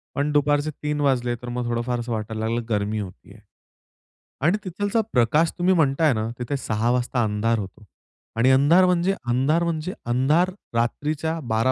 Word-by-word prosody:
पण 145 +1 0
दुपारचे 145 +1 +2
3 150 0 -1
वाजले 125 -4 +1
तर 120 - -7
मग 120 0 -3
थोडं 120 0 0
फार 120 0 -2
असं 120 0 -5
वाटायला 110 0 -3
लागलं 115 +1 -1
की - - -13
गर्मी 105 +1 -1
होतेय. 95 -3 -9 1.0
आणि 170 +8 +3
तिथलचा 205 +5 -1
प्रकाश 150 +7 +3
तुम्ही 180 +2 +3
म्हणताय 150 -1 +3
ना, 110 0 -2
तिथे 130 +3 -2
6 115 -1 -1
वाजता 125 -1 0
अंधार 110 +2 0
होतो 95 +1 -8 0.5
आणि 125 +3 +4
अंधार 145 +8 +5
म्हणजे, 180 +1 +2 0.2
अंधार 135 +7 +2
म्हणजे, 170 +1 -2
अंधार 135 +9 +2 0.2
रात्रीच्या 155 +7 -1
12 115 +2 +1
130 Hz, 170 wpm, -23 LUFS, 115-155 Hz, 1.0 s, अंधार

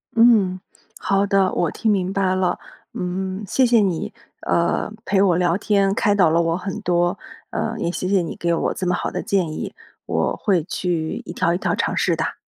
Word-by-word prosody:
嗯， 220 -6 +4 0.4
好 195 0 +1
的， 195 -2 +2
我 170 - 0
听 220 - 0
明 190 -2 0
白 195 -2 +1
了。 185 -1 0 0.4
嗯， 185 +2 -3
谢 260 +7 +3
谢 235 -1 +4
你， 185 -5 -1 0.3
呃， 170 +4 0
陪 195 -1 +2
我 190 -3 +4
聊 175 -1 +2
天， 200 -2 +2
开 205 0 +2
导 185 -5 +4
了 165 +2 +3
我 165 0 0
很 195 +3 -5
多。 175 0 +1 0.3
呃， 225 - -2
也 170 - -1
谢 185 - -3
谢 195 -1 +3
你 165 - -5
给 170 0 0
我 165 - 0
这 185 - -3
么 180 - +2
好 - - -3
的 - - -3
建 195 -6 0
议， - - -5 0.3
我 - - 0
会 185 -6 +1
去 170 -2 -2
一 - - -7
条 170 -1 +1
一 - - 0
条 - - -1
尝 - - -1
试 - - +1
哒。 - - -3
185 Hz, 220 characters per minute, -21 LUFS, 175-200 Hz, 0.4 s, 嗯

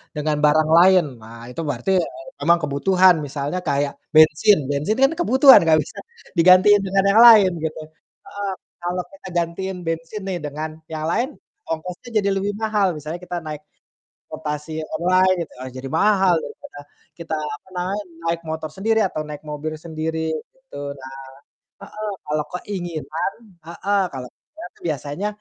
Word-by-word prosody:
dengan 150 0 -1
barang 155 +1 +3
lain. 185 -1 +6 0.2
Nah 115 +1 -11
itu 125 - -5
berarti, 145 +6 -2
eee, 135 -5 -8
memang 170 +1 +4
kebutuhan 180 +6 +4
misalnya 145 +5 -3
kayak 140 0 +1 0.2
bensin, 155 +6 +6
bensin 150 - -1
kan 270 - +5
kebutuhan 265 -4 +7
nggak 160 -1 +4
bisa - - -14 0.4
digantiin 185 +4 +6
dengan 195 0 +1
yang 215 - +5
lain 210 -5 +8
gitu. 160 0 -4 0.5
Heeh, 200 -1 -5 0.3
kalau 175 +1 -2
kita 195 -1 -13
gantiin 180 +3 -2
bensin 165 +5 -4
nih 185 - -2
dengan 150 +2 -4 0.2
yang 155 0 -3
lain, 240 +6 +1 0.4
ongkosnya 175 +7 -5
jadi 200 -1 0
lebih 200 +1 -1
mahal, 210 -2 +1
misalnya 155 +3 -6
kita 180 0 -5
naik 150 -1 -6 0.7
transportasi 150 0 -5 0.2
online 185 +2 +3
gitu, - - -15
eee, 130 - -6
jadi 130 +1 -6
mahal 195 -4 +4
daripada - - -10 0.4
kita 165 -1 -4
apa 150 +1 -6
namanya 190 +4 -2 0.3
naik 170 - -2
motor 160 0 -4
sendiri 220 +5 +1
atau 160 -4 -3
naik 150 0 -8
mobil 150 +1 -5
sendiri 160 0 -3 0.2
gitu. 265 - -14 0.2
Nah 130 0 -10 0.7
heeh, 215 0 -6 0.2
kalau 150 0 -1 0.2
keinginan 175 -3 -4 0.4
heeh, 200 +4 -1
kalo 130 -1 -5
keinginan 310 -5 -13
tuh - - -23
biasanya 145 +6 -3
170 Hz, 155 wpm, -21 LUFS, 150-195 Hz, 0.7 s, lain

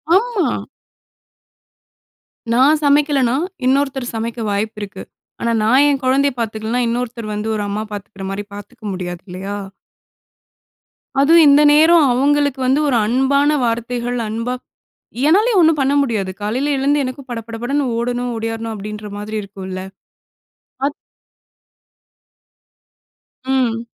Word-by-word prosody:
ஆமா. 430 -3 0 1.9
நான் 270 +6 +4
சமைக்கலன்னா, 285 -3 +3 0.3
இன்னொருத்தர் 270 -1 +1
சமைக்க 230 +1 -3
வாய்ப்பு 210 +1 -2
இருக்கு. 195 -2 -7 0.4
ஆனா 235 - +1
நான் 255 +6 +5
என் 280 -1 0
கொழந்தய 275 +2 +3
பாத்துக்கலன்னா, 220 +2 -2
இன்னொருத்தர் 235 -2 -3
வந்து 210 +1 -3
ஒரு 210 - -2
அம்மா 210 +2 -2
பாத்துக்குற 200 -1 -7
மாரி, 200 +1 -4
பாத்துக்க 205 +2 -12
முடியாது. 175 -2 -5
இல்லையா? 190 +3 -5 1.7
அதுவும் 330 +3 +6
இந்த 285 +1 +6
நேரம், 320 +1 +6
அவுங்களுக்கு 285 +1 +2
வந்து, 265 +3 +3
ஒரு 260 - +2
அன்பான 270 +5 +2
வார்த்தைகள், 240 +1 -2
அன்பா 230 +3 -2 0.8
என்னாலயும் 415 +6 +4
ஒண்ணும் 320 -2 +4
பண்ண 275 +1 +2
முடியாது. 215 -8 -1
காலையில 255 +8 0
எழுந்து, 285 +2 +2
எனக்கும் 260 +1 -7
பட, 235 -1 -3
பட 230 - -6
படன்னு 280 +3 0
ஓடணும், 245 +1 -2
ஓடியாறணும் 225 0 -4
அப்படின்ற 210 +1 -7
மாரி 210 +1 -5
இருக்குல்ல. 190 -2 -7 1.0
அத் 285 - -2 2.5
ம். 245 -3 0
245 Hz, 120 wpm, -18 LUFS, 215-280 Hz, 2.5 s, அதுவும்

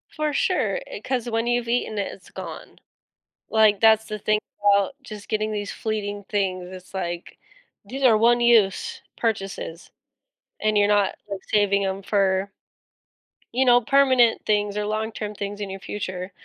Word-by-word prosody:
For 305 -1 -1
sure, 375 - 0
eh - - -8
'cause 245 -2 -2
when 225 0 0
you've 240 0 0
eaten 230 -3 -1
it, 200 - -2
it's 190 - -14
gone. - - -9 0.7
Like, 215 -2 +4
that's 220 -1 +5
the 215 -1 -5
thing 215 +1 +1 0.2
about 200 +3 +3
just 215 -5 -10
getting 215 0 0
these 205 -1 -3
fleeting 205 -2 -4
things. 185 -3 -1
It's 185 -1 -11
like 175 -2 -5 0.5
these 270 +1 -6
are 235 -5 +6
one-use 235 - +3 0.2
purchases 195 -6 -3 0.7
and 215 0 +1
you're 205 0 +4
not, 205 -1 +2
like, 200 -1 -5
saving 200 -1 +2
'em 190 0 -3
for 195 -1 +1 1.0
you 260 +2 +2
know, 245 -1 +6
permanent 260 -2 +4
things 205 -1 +1
or 210 - -1
long-term 215 0 -3
things 205 0 -5
in 205 -1 -4
your 195 - -6
future. 185 -2 -5
210 Hz, 155 wpm, -24 LUFS, 200-235 Hz, 1.0 s, are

